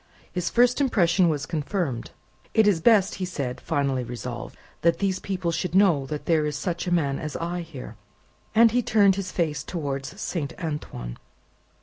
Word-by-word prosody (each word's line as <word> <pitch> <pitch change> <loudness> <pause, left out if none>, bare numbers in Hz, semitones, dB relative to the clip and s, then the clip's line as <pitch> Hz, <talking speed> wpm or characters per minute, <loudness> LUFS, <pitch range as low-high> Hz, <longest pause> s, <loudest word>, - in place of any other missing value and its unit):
His 180 -1 -1
first 245 +3 +3
impression 185 -8 +3
was 145 -2 -1
confirmed. 155 - -2 0.5
"It 220 -2 +5
is 185 -6 +3
best," 210 -1 +5
he - - +1
said, 140 -8 -4
finally 140 -4 0
resolved, 120 -2 -6 0.2
"that 170 0 +3
these 190 -2 0
people 185 -3 -2
should 180 +1 -2
know 170 -9 +4
there 150 +1 0
is 150 - -3
such 175 +2 -3
a - - -1
man 145 -6 +1
as 155 -1 -5
I 175 +1 -3
here." 160 -6 -9 0.6
And 230 0 +7
he 245 +2 +2
turned 205 -4 +4
his 190 -2 -4
face 150 -5 -1
towards 145 +2 -4
Saint 160 -9 -3
Antoine. 150 - -5
170 Hz, 165 wpm, -25 LUFS, 145-190 Hz, 0.6 s, And